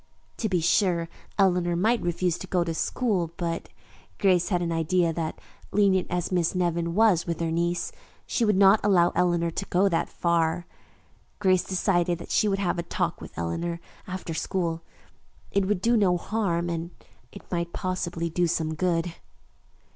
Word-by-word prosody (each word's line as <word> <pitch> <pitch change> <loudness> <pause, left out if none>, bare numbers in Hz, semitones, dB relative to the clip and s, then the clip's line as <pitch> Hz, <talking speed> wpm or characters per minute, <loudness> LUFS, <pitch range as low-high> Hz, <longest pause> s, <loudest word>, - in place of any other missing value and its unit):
To 220 - -1
be 180 -3 +1
sure, 170 -1 +2 0.3
Eleanor 180 -3 +3
might 220 +6 +2
refuse 175 0 -1
to 190 - -7
go 180 -1 +1
to 165 -1 -3
school, 180 -3 -1
but 170 -2 -3 0.5
Grace 185 -2 +3
had 180 -3 +1
an 170 - -2
idea 165 +1 +1
that, 160 -1 -3 0.3
lenient 195 -2 +3
as 175 +1 -2
Miss 175 -1 +1
Nevin 170 -1 0
was 210 -6 +4
with 170 -1 -2
her 165 -1 -1
niece, 170 +1 -1 0.3
she 240 - 0
would 210 -3 +3
not 195 +2 +6
allow 180 -4 +4
Eleanor 170 -1 +1
to 195 - -4
go 190 +2 +2
that 165 - 0
far. 170 0 0 0.7
Grace 185 -3 +3
decided 175 -2 +1
that 170 - -9
she 215 - +3
would 195 -1 +1
have 180 -3 -1
a - - +1
talk 170 - -2
with - - -11
Eleanor 170 - -2 0.3
after 185 -2 -5
school. 165 -1 -2 0.7
It 195 -1 +1
would 200 -3 0
do 235 +1 +4
no 190 -5 +3
harm 175 -3 -1
and 170 0 -3 0.4
it 200 - -11
might 170 -1 -2
possibly 175 -2 -2
do 175 +1 +1
some 160 -1 -1
good. 170 +1 0
175 Hz, 170 wpm, -26 LUFS, 170-190 Hz, 0.7 s, not